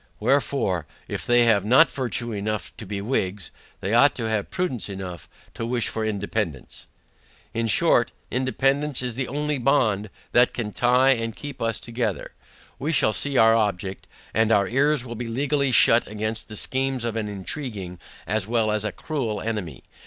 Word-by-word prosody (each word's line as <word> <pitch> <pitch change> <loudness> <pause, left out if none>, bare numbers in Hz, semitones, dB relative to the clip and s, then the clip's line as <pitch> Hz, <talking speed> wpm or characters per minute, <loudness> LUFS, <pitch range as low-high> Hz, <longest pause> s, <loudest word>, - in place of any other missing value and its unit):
WHEREFORE, 120 - 0 0.2
if - - -5
they 120 0 +5
have 105 -4 +4
not 130 +9 +5
virtue 120 -2 -3
enough 105 0 -3
to 110 - -9
be 100 0 -4
WHIGS, 100 -5 -2 0.3
they 100 +4 -2
ought 135 +5 +5
to 115 -3 -3
have 110 -2 -1
prudence 130 - -2
enough 90 -4 -7 0.2
to - - -5
wish 120 0 0
for 110 - -3
Independance. 100 - -3 0.7
In 115 0 -1
short, 120 0 +3 0.2
Independance 135 +2 +1
is 125 -1 -2
the 130 +2 -3
only 150 0 -2
BOND 110 -6 +2 0.2
that 120 +1 +4
can 110 -3 -3
tye 125 +4 +4
and 115 -3 -1
keep 145 -2 -8
us 115 -1 0
together. 120 0 -3 0.5
We 150 +4 -1
shall 125 -8 +4
then - - +1
see 140 -2 0
our 115 -1 +6
object, 100 -4 -1 0.3
and 110 0 +2
our 100 -3 +4
ears 135 +3 +2
will 120 - -6
be 120 +1 -5
legally 140 +3 0
shut 115 -1 +5
against 110 +2 -4
the 105 - -7
schemes 130 0 -1
of 115 -2 -2
an 110 -2 -2
intriguing, 100 - -5 0.3
as 110 -2 -1
well, 115 -2 +1
as 105 -1 0
a 110 - -2
cruel 120 -8 -3
enemy. 105 - -4
115 Hz, 175 wpm, -24 LUFS, 105-130 Hz, 0.7 s, our